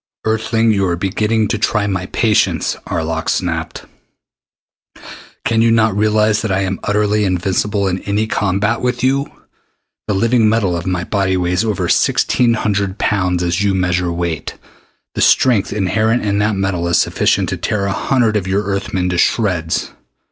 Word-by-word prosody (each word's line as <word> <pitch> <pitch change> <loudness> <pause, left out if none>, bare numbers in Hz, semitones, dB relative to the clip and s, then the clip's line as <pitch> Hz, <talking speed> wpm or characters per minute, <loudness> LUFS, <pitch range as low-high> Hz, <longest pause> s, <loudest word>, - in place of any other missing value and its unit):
"Earthling, 110 +1 +1
you 100 -2 +1
are 85 - 0
beginning 105 +4 0
to 110 - -1
try 105 -1 +1
my 95 -2 -2
patience," 110 -3 +1
Arlok 80 0 -2
snapped. 80 -3 -3 1.6
"Can 115 -1 +2
you 115 - +4
not 110 -3 +2
realize 105 0 +2
that 110 - -2
I 95 +1 +1
am 95 0 -2
utterly 105 0 +1
invincible 95 +2 0
in 95 0 -1
any 105 +2 -1
combat 105 +1 -1
with 125 -1 -1
you? 135 +2 +1 0.8
The 105 - 0
living 115 +1 +3
metal 105 -5 +1
of 85 +1 -5
my 90 -1 -1
body 95 -1 0
weighs 90 +3 0
over 110 -4 -1
sixteen 120 -2 +2
hundred 100 -3 -1
pounds, 90 -3 0
as 85 +1 0
you 100 -1 +1
measure 90 -1 0
weight. 85 -3 -3 0.6
The - - -3
strength 120 -7 +3
inherent 110 +4 0
in 100 0 0
that 105 0 +1
metal 95 -3 -1
is 85 - +2
sufficient - - +1
to - - -3
tear 100 -2 -2
a 100 - -1
hundred 120 -3 +1
of 95 -2 -3
your 100 +2 0
Earth 100 -1 -3
men 90 -1 0
to 90 -1 -1
shreds. 90 -8 0
100 Hz, 170 wpm, -17 LUFS, 90-110 Hz, 1.6 s, you